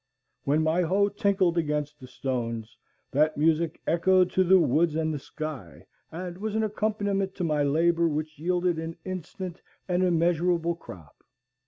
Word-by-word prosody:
When 150 +3 +2
my 160 +3 +2
hoe 195 +4 +2
tinkled 195 -4 +1
against 150 -1 -2
the 130 - -11
stones, 120 -3 -4 0.4
that 155 +2 +2
music 160 +1 +1
echoed 185 +2 +3
to 185 - +3
the 185 +1 +6
woods 165 0 +2
and 160 0 0
the 150 - -3
sky, 150 - -7 0.3
and 175 +2 -6
was 215 +1 -3
an 220 - +1
accompaniment 205 -2 -1
to 180 - -3
my 150 -3 +1
labor 165 +4 +3
which 155 -1 -3
yielded 175 0 0
an 165 0 -5
instant 185 0 -6 0.3
and 180 0 +1
immeasurable 170 -1 +2
crop. 90 - -13
170 Hz, 155 wpm, -27 LUFS, 150-185 Hz, 0.4 s, the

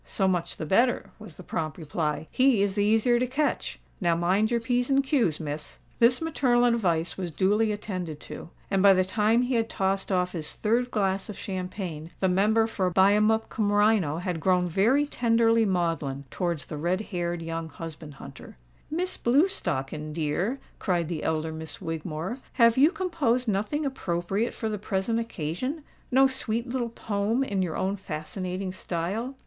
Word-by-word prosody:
"So 195 - 0
much 180 -2 -1
the 155 - -4
better," 235 +10 +2
was 210 -7 -11
the 185 - -10
prompt 155 -2 -3
reply: 155 -1 -2
"he 255 -6 +4
is 200 -1 0
the 205 0 +1
easier 225 +3 +3
to 250 - +1
catch. 285 +4 -1 0.2
Now 170 -2 +3
mind 185 +6 +2
your 235 -1 +1
p's 245 +2 0
and 275 0 +3
q's, 250 - +1
Miss." 150 -1 -5 0.2
This 245 +5 +4
maternal 250 -6 +2
advice 185 -9 +1
was 180 -2 -2
duly 205 +7 +2
attended 185 -7 -4
to; - - -9 0.2
and, 195 -1 +2
by 195 -1 +7
the 185 0 +2
time 220 +5 +2
he 250 +1 -1
had 225 -1 +1
tossed 195 +1 -1
off 180 -1 +1
his 160 -4 -4
third 235 +3 +1
glass 195 -3 -1
of 210 - -6
champagne, 180 -4 -5
the 190 - +2
Member 210 +5 +3
for 195 -5 -1
Buyemup 210 +4 +3
cum 210 -2 0
Rhino 205 -7 +3
had 180 -1 -3
grown 180 +1 +2
very 225 - +3
tenderly 230 -4 +3
maudlin 165 -7 -1
towards 170 -7 -2
the 150 - -6
red 175 +6 0
haired 175 -4 -3
young 165 0 -4
husband 160 -3 -9
hunter. 135 - -11 0.3
"Miss 360 +4 -2
Blewstocken, 155 - 0
dear," 170 - -1 0.2
cried 175 -4 0
the 165 -3 -3
elder 160 0 -1
Miss 160 0 -6
Wigmore, 165 - -4
"have 230 -2 +5
you 280 +4 +6
composed 300 -10 0
nothing 215 +9 0
appropriate 195 -4 -2
for 220 - -3
the 210 -2 -3
present 205 +3 -1
occasion?—no 255 - -1
sweet 245 -3 -1
little 245 -1 -2
poem 220 +2 -1
in 200 -7 -1
your 175 -4 -2
own 195 +1 0
fascinating 185 +2 -4
style?" 190 +9 -3
195 Hz, 170 wpm, -27 LUFS, 170-235 Hz, 0.3 s, by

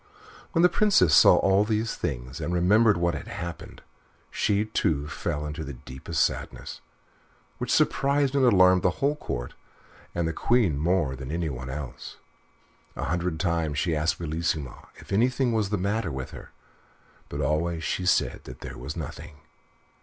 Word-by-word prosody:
When 165 -1 +3
the - - +9
Princess 180 - +3
saw - - +8
all 95 +1 +3
these 110 +1 -1
things, 65 0 -5
and - - -2
remembered 105 +4 +4
what 85 0 +1
had 80 - -6
happened, 85 0 -7 0.5
she, 105 0 +1
too, 75 -9 0
fell 75 -2 -3
into 75 +2 -5
the 70 -3 -7
deepest 65 +6 -2
sadness, - - -5 0.8
which - - -3
surprised 140 0 +2
and 140 -1 +2
alarmed 95 -6 +5
the 90 - +3
whole 145 +2 +1
Court, - - -5 0.6
and 85 -1 0
the 80 - -2
Queen 115 - +2
more 80 -4 +1
than 65 -1 -8
anyone 75 -7 -3
else. 70 -1 -7 0.8
A - - -4
hundred 85 -2 -2
times 85 -5 0
she 85 +1 0
asked 75 +2 0
Bellissima 80 -4 -3
if - - -14
anything 125 +4 +2
was 110 -3 0
the 105 - 0
matter 100 -1 -1
with 65 -1 -5
her; - - -10 0.8
but - - -5
she - - -1
always 85 +3 0
said - - 0
that 65 0 -10
there - - -8
was 70 +6 -6
nothing. 75 0 -7
85 Hz, 160 wpm, -26 LUFS, 75-105 Hz, 0.8 s, the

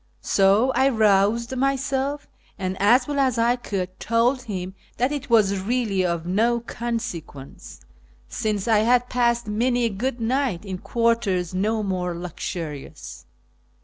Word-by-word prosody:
So 200 +6 +3
1 265 -2 +3
roused 220 +4 +3
myself, 275 +1 -1 0.3
and, 185 0 -3
as 240 +6 +4
well 290 -1 -2
as 260 -3 +2
I 235 +1 +3
could, 190 -6 -5
told 235 +3 +1
him 190 -6 -5 0.2
that 250 +3 +1
it 285 -2 -4
\vas 205 -5 +3
really 210 -2 0
of 170 -2 -1
uo 230 +6 +1
consequence, 225 - -6 0.5
since 210 - -2
I 220 -2 +4
had 245 +3 +2
passed 235 -1 +1
many 240 +4 0
a 230 - +2
good 240 +5 -3
night 230 -5 -1
in 190 -2 -5
quarters 230 -7 0
uo 210 +3 0
more 180 -3 -2
luxurious. 150 - -7
225 Hz, 140 wpm, -23 LUFS, 190-245 Hz, 0.5 s, as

